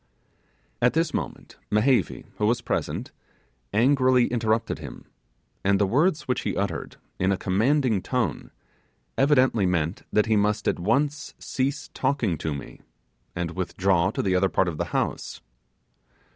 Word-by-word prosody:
At 125 +1 +4
this 165 -1 +1
moment, - - -5
Mehevi, 105 - +2
who 105 - +2
was 120 +2 +2
present, - - -3 0.6
angrily 130 +2 +4
interrupted 115 -1 0
him; - - -9 0.6
and 100 0 +3
the 100 - +3
words 150 - +2
which 125 - -1
he - - -2
uttered - - -3 0.2
in 95 +1 +2
a 95 - +1
commanding 110 +3 +1
tone, 120 - -2 0.7
evidently 130 -7 +3
meant 85 0 -1
that 105 - +3
he 110 -1 +2
must 105 0 +1
at - - +1
once 140 +10 0
cease 135 +2 -3
talking 130 - 0
to 80 - -2
me 70 -1 -7 0.5
and 90 -2 -2
withdraw 90 +1 +1
to - - -2
the 95 - +1
other 95 +1 +3
part 95 - +1
of 80 -3 -4
the 85 - 0
house. 85 - -3
110 Hz, 145 wpm, -25 LUFS, 95-130 Hz, 0.7 s, At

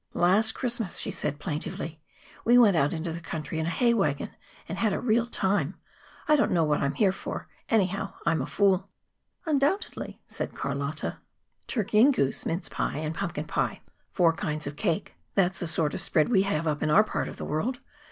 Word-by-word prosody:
"Last 205 +6 +4
Christmas," 235 -6 -2
she - - -1
said 145 - -2
plaintively, 155 0 -4 0.4
"we 240 +1 +5
went 215 -6 +6
out 145 -2 +3
into 165 0 -3
the 170 - -6
country 160 -1 -4
in 160 - -1
a - - +1
hay 235 +7 +3
wagon 150 -11 0 0.4
and 175 - -5
had 215 -3 +2
a - - -1
real 235 -1 +2
time. 190 - 0 0.5
I 305 - +6
don't 285 - +3
know 170 -2 +3
what 150 -1 +1
I - - +2
am 140 - -3
here 200 -4 +4
for, 190 - -6 0.2
anyhow. 195 -2 +1
I 170 - +4
am 160 -3 +1
a 130 - -3
fool." 195 -1 +2 0.6
"Undoubtedly," 300 +5 0
said - - -5
Carlotta. 140 +2 -3 0.5
"Turkey 215 -2 +2
and 275 +4 +7
goose, 140 - 0
mince 170 +4 -1
pie - - -2
and 155 +1 -2
pumpkin - - -3
pie, - - -1 0.3
four 170 -2 +4
kinds 155 -1 -3
of 140 +1 -5
cake; 190 +2 -1 0.2
that's 190 -1 +2
the 175 - -2
sort 155 -1 0
of - - -2
spread 155 -2 +2
we 205 -6 +4
have 180 -5 0
up 150 -1 0
in 155 - +1
our 200 +8 +6
part - - -2
of - - -8
the - - -5
world. 235 - -1
180 Hz, 205 wpm, -27 LUFS, 155-215 Hz, 0.6 s, and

